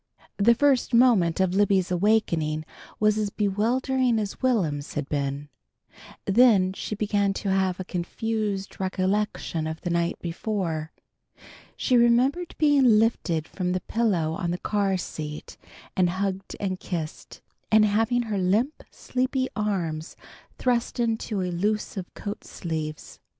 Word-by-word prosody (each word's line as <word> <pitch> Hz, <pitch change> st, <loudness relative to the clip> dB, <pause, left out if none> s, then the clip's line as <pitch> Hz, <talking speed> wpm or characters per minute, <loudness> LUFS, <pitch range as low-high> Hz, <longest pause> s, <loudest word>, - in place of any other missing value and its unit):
The 235 Hz, +4 st, +5 dB
first 265 Hz, -2 st, +2 dB
moment 220 Hz, -10 st, +4 dB
of 190 Hz, -1 st, +2 dB
Libby's 195 Hz, -2 st, +2 dB
awakening 170 Hz, -6 st, +1 dB, 0.3 s
was 215 Hz, 0 st, +3 dB
as 210 Hz, -1 st, 0 dB
bewildering 235 Hz, +5 st, +1 dB
as 210 Hz, -2 st, -3 dB
Will'm's 165 Hz, -, 0 dB
had 145 Hz, -2 st, -2 dB
been. 140 Hz, 0 st, -2 dB, 0.8 s
Then 195 Hz, -4 st, +5 dB
she 210 Hz, -, -4 dB
began 205 Hz, -1 st, +1 dB
to 195 Hz, -, -3 dB
have 190 Hz, -1 st, +1 dB
a -, -, -2 dB
confused 200 Hz, +2 st, -3 dB
recollection 190 Hz, -3 st, -1 dB
of 160 Hz, 0 st, -5 dB
the 175 Hz, -, -3 dB
night 170 Hz, 0 st, 0 dB
before. 170 Hz, -3 st, -3 dB, 0.9 s
She 250 Hz, -, +2 dB
remembered 250 Hz, +9 st, +3 dB
being 275 Hz, -7 st, +5 dB
lifted 175 Hz, -8 st, +1 dB
from 180 Hz, -2 st, -2 dB
the 185 Hz, -, -1 dB
pillow 185 Hz, -10 st, 0 dB
on 175 Hz, 0 st, -2 dB
the 175 Hz, -, -1 dB
car 200 Hz, -1 st, 0 dB
seat, 150 Hz, -4 st, -6 dB, 0.4 s
and 180 Hz, -2 st, +3 dB
hugged 190 Hz, +1 st, -3 dB
and 190 Hz, -2 st, -2 dB
kissed, 160 Hz, -4 st, -6 dB, 0.3 s
and 215 Hz, 0 st, +6 dB
having 225 Hz, +4 st, +2 dB
her 215 Hz, -4 st, -2 dB
limp, 215 Hz, +11 st, +1 dB
sleepy 260 Hz, +1 st, -2 dB
arms 175 Hz, -7 st, -2 dB, 0.4 s
thrust 245 Hz, -1 st, 0 dB
into 225 Hz, -3 st, -1 dB
elusive 185 Hz, +1 st, -2 dB
coat 205 Hz, 0 st, -6 dB
sleeves. 155 Hz, -3 st, -5 dB
200 Hz, 130 wpm, -25 LUFS, 175-225 Hz, 0.9 s, and